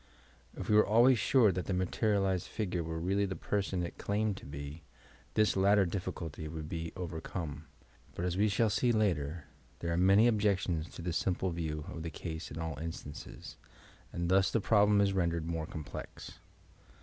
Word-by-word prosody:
If - - -6
we 105 - +3
were 105 - +7
always 120 +3 +5
sure 115 -5 +4
that 90 0 -3
the 95 - 0
materialized 95 0 +1
figure 90 -6 -2
were 80 0 -4
really 100 +4 +1
the 95 - -4
person 95 -3 -1
it 85 - -6
claimed 105 0 0
to - - -10
be, 70 +2 -7 0.5
this 105 -2 +3
latter 100 +1 +4
diBB 90 +1 -3
eulty 80 -1 -6
would 80 -1 -6
be 80 0 -4
overcome, 80 -3 -5 0.5
but 85 - -2
as 90 -1 -1
we 105 +3 +3
shall 105 +2 +2
see 120 +4 +2
later, 85 - 0 0.3
there 85 0 -2
are - - 0
many 100 +5 +6
objections 95 -7 +1
to 85 - -7
this 85 -2 -1
simple 95 0 0
view 80 -3 -3
of 80 - -6
the 85 - -4
ca«e 80 -1 -6
in 75 - -8
all 80 -4 -4
instances, 80 -3 -8 0.5
and 85 0 -2
thus 95 +1 +4
the 115 - +1
problem 105 -1 +4
is 100 -1 +2
rendered 85 -3 0
more 80 -1 -3
complex. 75 -3 -8
90 Hz, 185 wpm, -32 LUFS, 80-100 Hz, 0.5 s, were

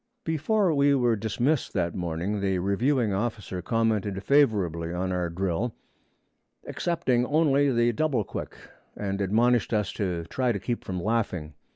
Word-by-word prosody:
Before 170 +4 +1
we 140 0 +4
were 120 -3 +2
dismissed 120 +7 -1
that 85 -4 0
morning, 90 +4 -2
the 95 -1 +1
reviewing 110 +5 +1
officer 105 -3 -3
commented 105 -2 0
favorably 95 - +2
on 90 +2 -2
our 90 -1 -1
drill, 95 +6 -2 0.9
excepting 160 -8 0
only 145 -2 +3
the 120 -1 +3
double 135 -4 +1
quick, - - -7 0.4
and 100 -1 -2
admonished 115 +5 +2
us 105 -3 0
to 90 -5 -2
try 125 +9 -1
to 100 - -3
keep 120 +4 -3
from 90 -1 -4
laughing. 95 -7 -1
110 Hz, 145 wpm, -26 LUFS, 95-125 Hz, 0.9 s, we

